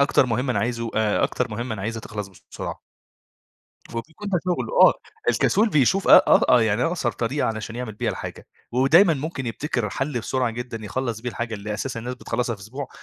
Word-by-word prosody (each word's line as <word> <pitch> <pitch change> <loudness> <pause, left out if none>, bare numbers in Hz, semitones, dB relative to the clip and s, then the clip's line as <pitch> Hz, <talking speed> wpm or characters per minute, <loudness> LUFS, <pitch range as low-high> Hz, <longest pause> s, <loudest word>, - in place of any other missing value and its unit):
...أكتر 140 -2 +4
مهمة 125 +3 0
أنا - - 0
عايزه 115 -1 -2
آآ، 110 -1 +2
أكتر - - -2
مهمة 115 +2 -3
أنا 95 - -6
عايزها 115 +1 -3
تخلص 105 -2 -6 0.2
بسرعة. - - -5 1.1
وبيكون 160 - -6
ده 180 - +2
شغله 180 - -1
آه، - - +8 0.4
الكسول 215 +3 +2
بيشوف 155 - +2
أ - - +5 0.2
آه - - +6 0.2
أ - - +3
يعني 110 +1 +1
أقصر 165 -8 0
طريقة 130 +5 -1
علشان 110 +1 -4
يعمل 125 -3 -4
بيها - - -1
الحاجة، - - -7 0.3
ودايمًا 160 +8 +5
ممكن 140 -2 -4
يبتكر 120 -3 -2
حَل 135 +1 -2
بسرعة 125 +1 -1
جدًا 115 -1 -6
يخلّص 115 +1 -3
بيه 125 - -4
الحاجة 115 -1 -4
اللي 105 +1 -5
أساسًا 115 +1 -4
الناس 125 +2 -4
بتخلّصها 120 -1 -2
في 100 - -14
أسبوع، 130 +6 -6
120 Hz, 195 wpm, -23 LUFS, 110-135 Hz, 1.1 s, آه